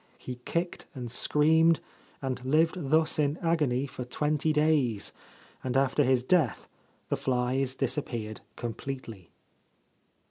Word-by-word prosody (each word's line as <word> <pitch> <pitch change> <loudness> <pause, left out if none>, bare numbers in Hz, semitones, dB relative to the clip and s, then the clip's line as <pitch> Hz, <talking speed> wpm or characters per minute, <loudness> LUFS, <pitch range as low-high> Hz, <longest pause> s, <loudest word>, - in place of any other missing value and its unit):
He 125 -1 -7
kicked 170 +1 -2
and 120 -3 -5
screamed 160 +5 +4 0.4
and 130 -2 -3
lived 155 +2 +1
thus 160 +1 +3
in 145 +1 +2
agony 150 -7 +1
for 130 -2 -6
twenty 150 +4 0
days, 150 -9 +2 0.5
and 130 0 0
after 135 +2 +3
his 130 -1 +3
death 140 - +2 0.4
the - - +1
flies 130 +1 0
disappeared 115 -7 -2
completely. 115 -6 -6
135 Hz, 115 wpm, -29 LUFS, 125-155 Hz, 0.5 s, screamed